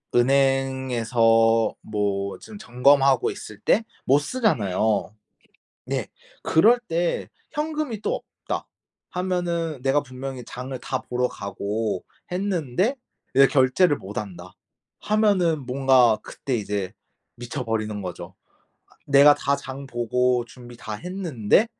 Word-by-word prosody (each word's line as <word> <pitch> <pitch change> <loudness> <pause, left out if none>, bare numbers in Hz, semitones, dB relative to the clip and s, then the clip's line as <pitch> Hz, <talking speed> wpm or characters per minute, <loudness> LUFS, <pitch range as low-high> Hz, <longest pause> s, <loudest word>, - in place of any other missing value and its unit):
은행에서 120 -4 +3
뭐 100 -2 -2
지금 210 -2 -11
점검하고 135 - +3
있을 110 - -10
때 225 - +2 0.2
못 140 +2 +5
쓰잖아요. 110 - 0 0.7
네. - - -2 0.3
그럴 225 +10 +5
때 170 +1 -1 0.2
현금이 300 -7 -3
또 - - 0 0.3
없다 - - -3 0.4
하면은 175 -4 -2
내가 135 +2 +2
분명히 130 -1 -7
장을 130 +1 -6
다 130 +1 -3
보러 125 0 -1
가고 100 0 -3 0.3
했는데 185 - 0 0.4
이제 135 0 +7
결제를 145 +4 +3
못 100 +2 -7
한다 90 -3 -7 0.5
하면은 190 -8 +2
뭔가 125 -4 +4
그때 130 - -5
이제 100 -3 -3 0.4
미쳐버리는 115 -4 -3
거죠. 90 -2 -7 0.7
내가 140 +1 +7
다 140 - 0
장 135 0 -8
보고 125 0 +1
준비 120 0 -13
다 110 -3 -7
했는데 175 - +1
130 Hz, 230 characters per minute, -24 LUFS, 115-160 Hz, 0.7 s, 이제